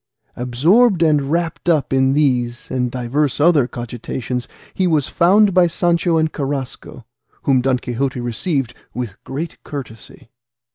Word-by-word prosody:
Absorbed 170 - +3
and 150 -3 +2
wrapped 170 +1 -1
up 155 -5 +1
in 130 0 +3
these 125 -5 0
and 125 -1 0
divers 130 +4 -1
other 150 -5 +4
cogitations, 120 0 -5 0.3
he 185 - +1
was 155 -5 +1
found 195 +3 +4
by 180 -1 +5
Sancho 170 0 +1
and 160 0 0
Carrasco, 140 -2 -5 0.4
whom 130 -2 +3
Don 130 0 +1
Quixote 125 +1 -3
received 120 +2 -2 0.2
with 120 -6 -6
great 150 +5 -6
courtesy. 125 -2 -9
140 Hz, 135 wpm, -19 LUFS, 125-165 Hz, 0.4 s, by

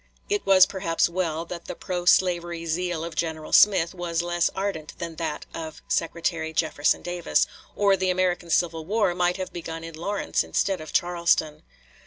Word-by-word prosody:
It 410 0 0
was 190 -1 +8
perhaps 185 -4 0
well 170 -2 -2
that 170 0 -8
the - - -6
pro 180 -1 -4
slavery 175 -2 +2
zeal 170 0 -1
of 170 0 -5
General 160 -1 -3
Smith 190 -5 +5
was 170 -2 -2
less 175 0 +1
ardent 190 -6 -4
than 165 -1 -6
that 160 -3 -3
of 160 -1 -7
Secretary 165 -1 -1
Jefferson 155 -2 +1
Davis, 175 -1 +1 0.3
or 200 -1 +4
the 190 0 0
American 180 -1 0
civil 165 -1 +1
war 200 +1 +1
might 180 +1 +1
have 185 -1 -5
begun 165 -1 -6
in 165 0 -8
Lawrence 195 +6 -1
instead 195 -4 -1
of 155 - -8
Charleston. 170 -3 +1
175 Hz, 170 wpm, -25 LUFS, 165-185 Hz, 0.3 s, was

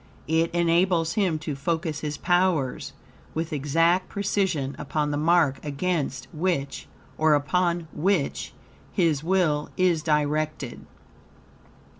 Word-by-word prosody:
It 160 +1 +2
enables 170 0 +2
him 190 -7 +1
to 150 - -2
focus 160 +1 -2
his 150 -1 -4
powers 175 -7 +1 0.4
with 160 0 -2
exact 165 +5 +2
precision 190 -9 -1
upon 150 0 -1
the - - -1
mark 155 -3 +2
against 150 -1 -2
which, 155 -4 -2 0.3
or 155 -1 +5
upon 170 +3 0
which, 175 -4 0 0.4
his 160 -5 +1
will 165 -5 +1
is 180 -3 +3
directed. 150 -3 -1
160 Hz, 110 wpm, -25 LUFS, 150-175 Hz, 0.4 s, or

